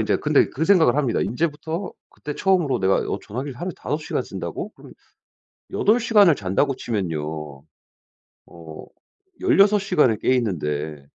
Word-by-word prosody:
인제 - - +1
근데 - - +2
그 155 - -2
생각을 165 -9 +4
합니다. 135 -6 +1
인제부터 160 - -3 0.2
그때 150 - -8
처음으로 175 -10 +1
내가 95 0 +3
어 - - -2
전화기를 130 +4 -6
하루에 180 +1 -4
5 150 - -3
시간 150 - -3
쓴다고? 90 -7 -6
그럼 - - -15 0.8
8 220 +4 +2
시간을 205 - +5
잔다고 100 +8 0
치면요, 75 - -4 0.8
어 80 -2 -11 0.6
16 210 - +4
시간을 150 - +2
깨 130 - +2
있는데 75 - -3
130 Hz, 295 characters per minute, -22 LUFS, -, 0.8 s, 시간을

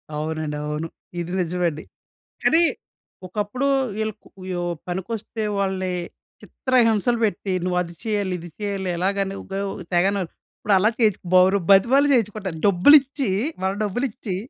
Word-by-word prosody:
అవునండి. 155 0 -3
అవును. 150 +2 -3 0.3
ఇది 175 0 -4
నిజమండి. 170 -3 -1 0.6
కానీ 330 +1 +5 0.6
ఒకప్పుడు 210 +8 -2 0.3
వీళ్ళు 220 0 -2 0.4
యొ 180 - -2 0.3
పనికొస్తే 215 +5 -4
వాళ్ళని 190 -2 -1 0.5
చిత్రహింసలు 235 -2 +2
పెట్టి, 200 -2 -1
నువ్వు 180 0 0
అది 170 -1 -6
చేయాలి, 205 -4 -1
ఇది 175 +1 -9
చేయాలి 200 -2 -2
ఎలాగని 195 +2 0
ఉగ - - -19 0.4
తెగన 195 +3 +3 0.4
ఇప్పుడు 205 - +1
అలా 205 +3 +4
చేయించి, 215 -5 +2
బరు 185 +2 +6
బతిమాలి 250 +9 +5
చేయించుకుంటారు. 210 -7 -1
డబ్బులిచ్చి 270 +6 +5 0.3
మన 190 - +2
డబ్బులిచ్చి 210 -2 -3
195 Hz, 120 wpm, -23 LUFS, 180-220 Hz, 0.6 s, బరు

